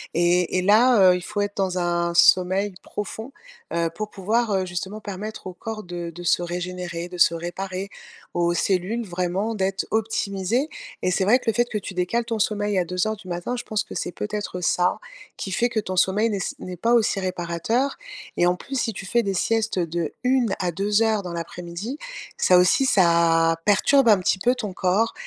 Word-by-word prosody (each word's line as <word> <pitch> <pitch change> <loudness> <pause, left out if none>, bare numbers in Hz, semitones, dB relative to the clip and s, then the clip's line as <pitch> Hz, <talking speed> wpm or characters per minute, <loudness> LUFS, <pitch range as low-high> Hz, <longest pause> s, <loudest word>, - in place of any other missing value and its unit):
et 175 +1 +2
et 185 - +2
là, 210 -1 +6
heu, - - +3
il 180 - -3
faut 205 +3 -3
être 205 0 -3
dans 190 -2 0
un 170 -1 0
sommeil 185 +3 +4
profond, 220 +5 -6 0.4
heu, 170 -1 0
pour 215 0 -4
pouvoir, 215 +4 0
heu, 190 -1 +1
justement 190 +4 -5
permettre 210 +1 -7
au 185 - -6
corps 220 +3 -6
de 175 -1 -6
de 175 +1 -9
se 175 - +2
régénérer, 175 0 -4
de 180 0 -9
se 170 - +6
réparer, 185 +3 -4 0.5
aux 175 0 +1
cellules 195 +6 0
vraiment 185 +4 -2
d'être 190 -1 -1
optimisées. 220 +3 0 0.4
Et 185 - +2
c'est 190 - +1
vrai 225 +6 +5
que - - -13
le 225 - +3
fait 240 0 +2
que 215 - -2
tu 195 -1 -6
décales 180 +7 0
ton 225 -1 -3
sommeil 205 -1 0
à 180 - 0
02:00, 185 +3 -3
je 245 - -5
pense 210 -1 -1
que - - -10
c'est 175 - -3
peut-être 205 -4 -4
ça, 180 +1 +1 0.4
qui 195 - -5
fait 240 +5 +2
que 235 - -1
ton 185 -2 -5
sommeil 200 +5 +3
n'est 205 - -1
s 190 - -3
n'est 180 -1 -7
pas 230 +6 +1
aussi 220 -4 +3
réparateur 185 +8 -1 0.4
et 175 - +4
en 180 - +2
plus, 270 +9 -8
si 225 -3 -1
tu 190 - -7
fais 235 +5 +2
des 200 -3 -2
siestes 220 +1 0
de 170 -2 -2
1 250 -5 +2
à 180 -1 0
2 205 +5 +1
heures 220 -2 +1
dans 175 -1 -6
l'après-midi, 175 - -6 0.4
ça 180 - +5
aussi, 180 +9 +4
ça 170 -5 +4
perturbe 240 +6 +4
un 210 - +7
petit 185 +1 +1
peu 245 +6 +2
ton 210 -6 -5
corps. 190 +6 +1
190 Hz, 200 wpm, -23 LUFS, 180-215 Hz, 0.5 s, un